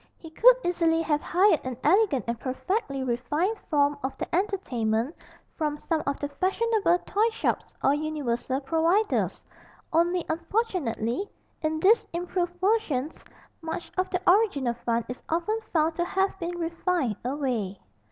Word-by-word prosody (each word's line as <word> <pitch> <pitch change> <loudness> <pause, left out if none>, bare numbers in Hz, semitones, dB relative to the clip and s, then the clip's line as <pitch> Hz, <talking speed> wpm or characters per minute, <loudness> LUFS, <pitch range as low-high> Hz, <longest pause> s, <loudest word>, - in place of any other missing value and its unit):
He 325 - -12
could - - +7
easily 330 -2 +2
have 300 -2 +1
hired 365 -1 +3
an 255 -2 -4
elegant 360 - +3
and 235 -1 -2
perfectly 275 - -2
refined 295 - 0
form 285 -1 +2
of 265 - -3
the - - -3
entertainment 275 - 0 0.4
from 300 -2 -1
some 315 +1 -1
of 280 - -1
the 285 - -2
fashionable 385 +3 +1
toy 430 +3 +2
shops 450 - -2
or 275 - +4
'universal 285 -4 -2
providers,' 335 +9 +1 0.5
only 345 +1 +2
unfortunately 335 - -1 0.3
in 315 0 -1
these 425 +7 +4
improved 350 0 -2
versions 350 - 0 0.4
much 325 +1 -5
of 370 0 0
the 365 - 0
original 355 - +3
fun 235 -1 -1
is 250 - -7
often 345 +7 0
found 320 0 +2
to 345 - +1
have 385 +1 0
been 345 0 -3
refined 335 - -1
away. 245 -8 -2
325 Hz, 140 wpm, -27 LUFS, 270-370 Hz, 0.5 s, could